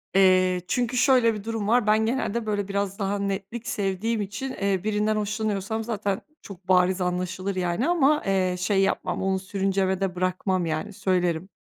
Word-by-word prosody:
Eee, 185 -1 +4
çünkü 245 +2 0
şöyle 245 -3 +4
bir 210 -2 -6
durum 225 -2 -3
var. 235 -1 +3
Ben 215 +1 +4
genelde, 235 -2 -1
böyle 205 -2 -1
biraz 200 0 -2
daha 200 +1 -1
netlik 200 +4 -4
sevdiğim 205 +3 -1
için, 205 +7 -4
eee, 195 -4 0
birinden 215 0 +1
hoşlanıyorsam 215 0 -2
zaten 205 -3 -2 0.2
çok 190 -2 -12
bariz 185 0 +3
anlaşılır 180 +2 -2
yani, 180 - 0
ama, 305 -3 +3
eee, 185 -2 +1
şey 195 +2 +2
yapmam, 180 -2 -1
onu 190 0 +1
sürüncemede 190 -1 -1
bırakmam 185 0 0
yani, 165 +6 -3
söylerim. 180 -1 0
200 Hz, 160 wpm, -25 LUFS, 185-215 Hz, 0.2 s, Eee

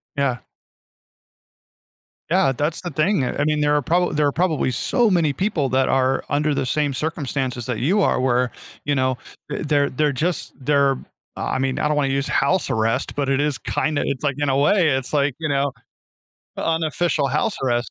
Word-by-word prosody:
Yeah. 135 -4 0 1.9
Yeah, 140 -8 +3
that's 150 +5 -2
the 175 - -4
thing, 155 +1 +1
uh, 125 - -2
I 145 - +1
mean, 150 0 +1
there 150 0 +2
are 145 - +2
prob 175 +3 +1
there 150 - +2
are 140 - +1
probably 160 -6 0
so 235 - +1
many 165 -6 +2
people 180 -7 0
that 130 +1 +2
are 130 0 +2
under 150 +1 +1
the - - -1
same 145 +2 0
circumstances 135 -5 -3
that 125 -3 -3
you 190 +10 +2
are - - +2
where, 125 -1 +1 0.3
you 145 - +1
know, 130 -1 +1 0.3
th 150 - -4 0.3
they're 150 +1 +2
just, 170 +6 -2
they're 140 -1 +2 0.4
I - - -2
mean, 135 0 -1
I - - +1
don't 150 0 0
want 140 - +2
to 135 - -1
use 140 +1 -1
house 160 +4 +1
arrest, 115 +2 0
but 140 -2 -1
it 135 +1 +2
is 145 -2 0
kinda 155 -2 -1
it's 135 0 -3
like 140 -3 0
in 145 -1 +1
a 135 - +2
way, 160 +4 +4
it's 130 -2 -1
like, 140 -2 +1
you 155 -2 -2
know, 140 0 +1 0.9
unofficial 160 -2 0
house 150 - 0
arrest. 120 -2 0
145 Hz, 195 wpm, -22 LUFS, 130-155 Hz, 1.9 s, way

